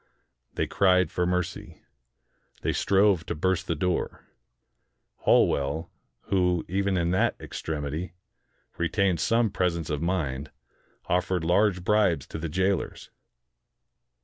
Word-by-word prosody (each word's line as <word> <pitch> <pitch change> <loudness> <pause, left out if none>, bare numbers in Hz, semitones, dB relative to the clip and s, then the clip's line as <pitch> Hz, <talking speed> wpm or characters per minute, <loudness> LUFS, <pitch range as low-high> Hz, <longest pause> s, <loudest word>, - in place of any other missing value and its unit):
They - - 0
cried 95 -1 +3
for 90 0 0
mercy. 90 -1 -3 0.8
They - - +1
strove 100 -3 +3
to - - -2
burst 90 +3 0
the 85 - 0
door. 90 +3 -2 1.0
Holwell, 70 +5 +2 0.3
who, 90 -3 +1
even 95 +1 0
in 85 0 +1
that 95 - +2
ex - - -7
tremity, 80 +3 -4 0.7
retained 90 +1 +1
some 115 -2 +2
presence 85 -5 -1
of 75 -1 -2
mind, 80 -6 -2 0.6
offered 90 -1 0
large 90 +2 +2
bribes 105 -4 +2
to - - -5
the 80 0 -4
jailers. 95 +3 -1
90 Hz, 120 wpm, -27 LUFS, 80-95 Hz, 1.0 s, cried